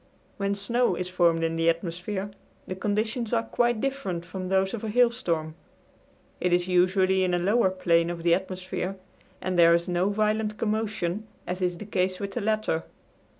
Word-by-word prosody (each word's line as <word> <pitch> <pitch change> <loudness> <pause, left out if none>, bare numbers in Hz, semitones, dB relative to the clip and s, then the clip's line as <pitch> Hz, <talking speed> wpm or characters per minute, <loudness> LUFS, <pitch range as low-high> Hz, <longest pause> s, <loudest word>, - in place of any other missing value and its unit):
When 200 0 0
snow 235 +1 +1
is 180 +1 -4
formed 170 -2 +2
in 165 0 0
the 165 0 +3
atmosphere, 180 +4 -3 0.3
the - - -4
conditions 215 +4 -1
are 230 -1 +2
quite 240 -1 +1
different 240 -11 -3
from 185 +1 -6
those 190 0 +2
of 230 - -5
a 220 - -2
hailstorm; 205 -10 +1 0.9
it 180 - 0
is 175 0 +2
usually 185 +1 +3
in 180 -1 +1
a - - +2
lower 195 +4 +3
plane 170 -2 +2
of 170 -1 -5
the 170 0 +4
atmosphere, 185 +1 -3 0.5
and 185 -1 -1
there 170 0 +7
is 170 +1 -1
no 180 +2 +1
violent 215 +1 0
commotion, 215 -2 -2 0.2
as 180 +1 -4
is 180 -1 0
the 210 - -8
case 185 -2 -1
with 200 -1 -4
the 245 - -3
latter. 215 -6 0
190 Hz, 180 wpm, -26 LUFS, 175-215 Hz, 0.9 s, there